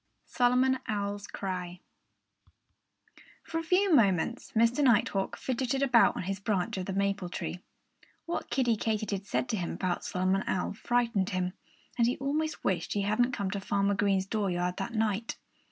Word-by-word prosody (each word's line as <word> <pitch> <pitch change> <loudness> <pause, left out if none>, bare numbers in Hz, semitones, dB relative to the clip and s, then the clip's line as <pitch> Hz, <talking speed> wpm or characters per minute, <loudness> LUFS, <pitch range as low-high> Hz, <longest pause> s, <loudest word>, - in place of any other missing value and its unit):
V - - -26
SOLOMON 255 +1 +3
OWL'S 205 -1 -2
CRY 180 -2 -5 1.6
For 325 - -3
a - - -4
few 365 +2 +3
moments 215 - +2
Mr. 230 +6 +3
Nighthawk 205 -6 +2
fidgeted 260 +1 -1
about 250 -4 +5
on - - -3
his 195 +1 -3
branch 195 -4 -1
of 185 - -4
the 195 - -2
maple 200 -2 0
tree. 180 - -4 0.7
What 340 - -3
Kiddie 245 -4 +2
Katydid 210 -3 -2
said 255 - 0
to 220 - 0
him 175 -3 -3
about 180 -2 -2
Solomon 185 +1 0
Owl 185 - -1
frightened 230 -3 0
him. 185 -1 -1 0.5
And 235 - +5
he 245 - 0
almost 305 +3 -2
wished 175 -3 0
he 205 - 0
hadn't 240 +5 +2
come 200 -4 -2
to 200 - -2
Farmer 200 0 +1
Green's 195 -1 +1
dooryard 180 -4 -1
that 200 +4 -4
night. 220 0 -1
205 Hz, 165 wpm, -30 LUFS, 190-245 Hz, 1.6 s, about